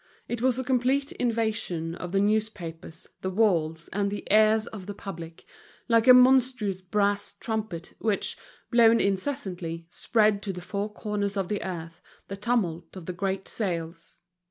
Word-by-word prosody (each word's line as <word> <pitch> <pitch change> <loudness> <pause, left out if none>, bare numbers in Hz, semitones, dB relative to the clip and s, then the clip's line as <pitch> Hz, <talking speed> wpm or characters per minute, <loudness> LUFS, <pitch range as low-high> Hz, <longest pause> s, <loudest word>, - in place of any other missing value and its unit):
It 240 -1 -3
was 255 -1 +2
a 260 - -1
complete 260 +2 +1
invasion 220 -8 -1
of 180 0 -6
the 195 - +2
newspapers, 195 -6 -2 0.2
the 190 - -2
walls, 170 -6 +1
and 200 +1 0
the 205 0 -6
ears 215 +1 +5
of 200 -5 -9
the 205 - -5
public, 165 -5 -8 0.4
like 230 0 +3
a 255 - +11
monstrous 250 -6 +4
brass 200 +2 0
trumpet, 215 -7 -4
which, 215 -3 0 0.4
blown 230 -1 +6
incessantly, 185 - -2
spread 215 -1 +2
to 200 -2 -3
the 180 - -6
four 200 +3 -3
corners 205 -1 -3
of 190 -2 -1
the 205 -1 -2
earth 165 -2 -6 0.3
the 195 - -4
tumult 195 -7 -1
of 180 - -9
the 180 - -4
great 190 +1 -2
sales. 170 -5 -4
200 Hz, 155 wpm, -27 LUFS, 175-225 Hz, 0.4 s, a